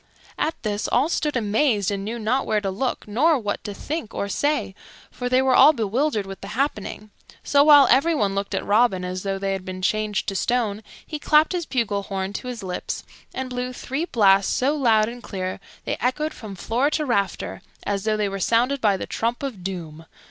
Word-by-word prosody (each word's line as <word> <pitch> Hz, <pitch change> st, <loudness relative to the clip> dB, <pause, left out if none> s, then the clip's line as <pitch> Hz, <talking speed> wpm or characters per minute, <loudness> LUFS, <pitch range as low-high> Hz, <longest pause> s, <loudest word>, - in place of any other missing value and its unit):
At 320 Hz, -, 0 dB
this 210 Hz, -1 st, -1 dB
all 265 Hz, +6 st, +2 dB
stood 300 Hz, -5 st, 0 dB
amazed, 215 Hz, -2 st, +1 dB
and 195 Hz, -1 st, -3 dB
knew 225 Hz, +4 st, -4 dB
not 235 Hz, +4 st, 0 dB
where 215 Hz, -, +2 dB
to 195 Hz, -2 st, -2 dB
look 245 Hz, +5 st, -3 dB
nor 290 Hz, +10 st, +3 dB
what 205 Hz, -5 st, -3 dB
to 205 Hz, -, -3 dB
think 280 Hz, +4 st, -5 dB
or 200 Hz, -, -2 dB
say, 290 Hz, 0 st, 0 dB, 0.4 s
for 245 Hz, -1 st, -4 dB
they 255 Hz, +1 st, +3 dB
were 265 Hz, -1 st, +3 dB
all 280 Hz, +5 st, +8 dB
bewildered 230 Hz, 0 st, 0 dB
with 195 Hz, 0 st, -9 dB
the 195 Hz, -, -7 dB
happening; 215 Hz, -6 st, -2 dB, 0.3 s
so, 285 Hz, 0 st, +4 dB
while 290 Hz, -2 st, +8 dB
everyone 260 Hz, -6 st, +3 dB
looked 200 Hz, 0 st, -2 dB
at -, -, -2 dB
Robin 205 Hz, -3 st, +3 dB
as 185 Hz, 0 st, -4 dB
though 195 Hz, 0 st, -2 dB
they 195 Hz, 0 st, -1 dB
had 190 Hz, -1 st, -4 dB
been 185 Hz, 0 st, -7 dB
changed 210 Hz, +3 st, 0 dB
to 195 Hz, -, -5 dB
stone, 220 Hz, -1 st, 0 dB, 0.2 s
he 305 Hz, -, -5 dB
clapped 305 Hz, +1 st, +4 dB
his 350 Hz, -3 st, -2 dB
bugle 220 Hz, -6 st, 0 dB
horn 195 Hz, 0 st, -4 dB
to 250 Hz, -, -5 dB
his 240 Hz, -4 st, -5 dB
lips 180 Hz, -1 st, -4 dB, 0.3 s
and 260 Hz, -1 st, -5 dB
blew 250 Hz, 0 st, -3 dB
three 270 Hz, +6 st, -3 dB
blasts 200 Hz, -, +4 dB
so 275 Hz, +4 st, +1 dB
loud 225 Hz, -6 st, +3 dB
and 240 Hz, +1 st, -7 dB
clear, 185 Hz, -4 st, -4 dB, 0.3 s
they -, -, -2 dB
echoed 300 Hz, +6 st, 0 dB
from 210 Hz, -3 st, -9 dB
floor 240 Hz, +9 st, 0 dB
to 305 Hz, 0 st, -1 dB
rafter 200 Hz, -7 st, -1 dB, 0.2 s
as 200 Hz, -1 st, -2 dB
though 215 Hz, -1 st, +1 dB
they 210 Hz, -1 st, 0 dB
were 195 Hz, 0 st, -4 dB
sounded 245 Hz, +7 st, +2 dB
by 205 Hz, -3 st, +3 dB
the -, -, -5 dB
trump 235 Hz, +4 st, -2 dB
of 235 Hz, -10 st, -5 dB
doom. 165 Hz, -4 st, -6 dB
220 Hz, 210 wpm, -23 LUFS, 195-265 Hz, 0.4 s, all